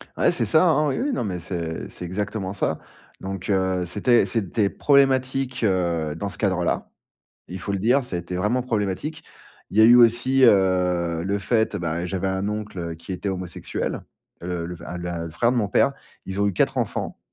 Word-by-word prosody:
Ouais, - - +3
c'est 115 - 0
ça, 155 - +4
hein, 155 -2 +3
oui, - - -1
oui, 280 +2 0
non, 240 - -1
mais 90 -4 -3
c'est 85 -2 -5
c'est 90 - -7
exactement 100 +1 -3
ça. 80 -5 -1 0.4
Donc 95 0 -5
heu, 95 -2 +1
c'était 105 +5 +3
c'était 100 0 0
problématique, 135 -2 +2
heu, 85 -6 0
dans 100 +4 -4
ce - - -6
cadre-là. 95 -4 0 0.6
Il 90 +1 -7
faut 100 +3 -4
le 100 - 0
dire, 125 +6 +3
ça 90 -8 -4
été 85 +1 -5
vraiment 105 +7 +1
problématique. 115 - -2 0.5
Il 105 - -5
y - - +8
a - - +8
eu 120 +2 +8
aussi, 120 +3 +5
heu, 90 -5 +3
le 100 +2 0
fait, 110 +2 +1
et - - -2
ben, 85 +1 -2
j'avais 95 +1 -2
un 95 +1 -1
oncle 95 -6 -5
qui 85 +4 -10
était 95 +2 -3
homosexuel, 90 -2 -4 0.4
le 85 -1 -3
le 90 - -6
enf 85 +1 -7
la 85 -1 -4
le 85 - -6
frère 120 +8 +1
de 125 - 0
mon 105 -3 +1
père, 135 +7 +2 0.3
ils 95 +1 -5
ont 100 - +3
eu 100 - -1
4 - - +1
enfants, - - -2
95 Hz, 205 wpm, -23 LUFS, 90-115 Hz, 0.6 s, y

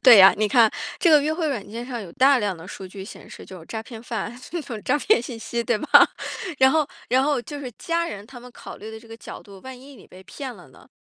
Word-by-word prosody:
对 250 -4 +10
呀， 190 0 +10
你 215 - +2
看， 225 -1 +5 0.3
这 340 - +4
个 300 - +7
约 305 - 0
会 320 -2 -1
软 240 -8 -3
件 230 +3 -6
上 245 -2 -5
有 180 -5 -9
大 270 +1 +5
量 205 -5 -1
的 165 +2 -11
数 190 - -8
据 190 +1 -9
显 215 - -12
示， - - -11
就 185 - -11
是 165 - -14
诈 220 -1 -5
骗 225 0 -10
犯， 230 -1 -4 0.2
那 345 - -2
种 225 -6 -7
诈 270 - +2
骗 430 - +3
信 240 -1 -7
息 235 +1 -3
对 235 - +1
吧。 305 - -6 0.7
然 265 0 +6
后 310 0 +2 0.2
然 255 +2 +3
后 285 -2 +1
就 290 +2 -7
是 265 -3 -6
家 335 0 -1
人 205 -11 -7
他 245 - -11
们 250 +1 -13
考 - - -10
虑 220 - -9
的 220 - -8
这 230 - -17
个 225 - -9
角 - - -10
度， 200 -2 -14
万 260 -1 -8
一 275 +2 -14
你 205 - -16
被 185 +1 -15
骗 260 +4 -7
了 175 -7 -15
呢， - - -19
240 Hz, 305 characters per minute, -23 LUFS, 210-275 Hz, 0.7 s, 对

